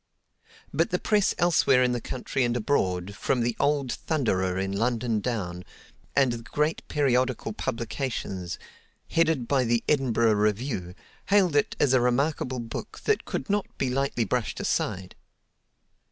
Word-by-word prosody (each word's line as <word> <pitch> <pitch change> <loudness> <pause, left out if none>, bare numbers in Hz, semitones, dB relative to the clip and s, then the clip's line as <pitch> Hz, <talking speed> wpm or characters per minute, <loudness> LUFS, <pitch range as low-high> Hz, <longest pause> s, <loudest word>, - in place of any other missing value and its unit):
But - - +2
the - - +1
press 210 -2 +2
elsewhere 145 -7 +4
in 125 - +2
the 120 -1 -2
country 130 +2 -2
and 120 0 +1
abroad, 95 -6 0
from 125 +4 0
the 120 0 0
old 140 -3 +1
"Thunderer" 95 - 0
in 95 0 -1
London 115 +2 0
down, 95 -6 -3 0.5
and 135 -3 +4
the 120 - -3
great 150 +8 -1
periodical 130 -5 +1
publications, 115 -7 -3 0.5
headed 160 -7 +2
by 135 -2 +2
the 120 -1 +1
"Edinburgh 120 -6 +3
Review," 105 -3 -1 0.3
hailed 195 -6 +4
it 145 - +2
as 140 -3 +3
a 130 - +5
remarkable 130 +1 0
book 115 -2 -6
that - - +1
could 135 - -4
not 205 0 0
be 130 -2 0
lightly 135 -3 0
brushed 125 -2 -2
aside. 95 -3 -1
125 Hz, 145 wpm, -26 LUFS, 110-140 Hz, 0.5 s, a